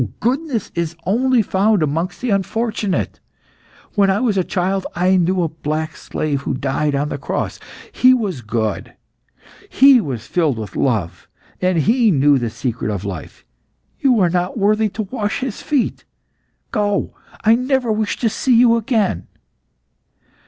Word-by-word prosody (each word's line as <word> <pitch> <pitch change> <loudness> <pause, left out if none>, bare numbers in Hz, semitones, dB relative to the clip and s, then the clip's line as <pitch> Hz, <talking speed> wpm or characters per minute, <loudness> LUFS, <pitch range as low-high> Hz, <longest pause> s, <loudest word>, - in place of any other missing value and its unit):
Goodness 255 - -1
is 170 -1 -2
only 245 +4 +2
found 200 -1 +2
amongst 165 +5 -2
the 245 -2 -1
unfortunate. 205 0 -1 0.7
When 200 -2 +3
I 190 +1 +2
was 225 -4 +1
a 190 - +2
child 190 +2 -1
I 180 +2 +3
knew 180 0 +2
a - - +1
black 155 0 -4
slave 145 -3 -3
who 140 - -2
died 140 +2 -1
on 145 +2 -1
the - - -4
cross. - - -3 0.3
He 255 - +5
was 205 - 0
good; 110 -2 -3 0.7
he 270 -2 +6
was 125 - -5
filled 155 -8 0
with 105 -5 -7
love, 110 -10 -1 0.3
and 185 -1 +2
he 225 - +3
knew 145 -4 +4
the 120 -2 -2
secret 115 0 -3
of 100 -2 -3
life. 95 -6 -7 0.5
You 255 -5 +3
are 175 -2 +3
not 180 +4 -1
worthy 215 +1 +2
to 215 +2 -4
wash 210 +1 -3
his 255 -5 -4
feet. 290 -5 -1 0.7
Go! 205 -3 0 0.3
I 220 - +5
never 255 0 +1
wish 215 -1 -1
to 230 - +2
see 235 +3 +2
you 235 -1 +5
again!" 215 - 0
190 Hz, 155 wpm, -19 LUFS, 150-225 Hz, 0.7 s, he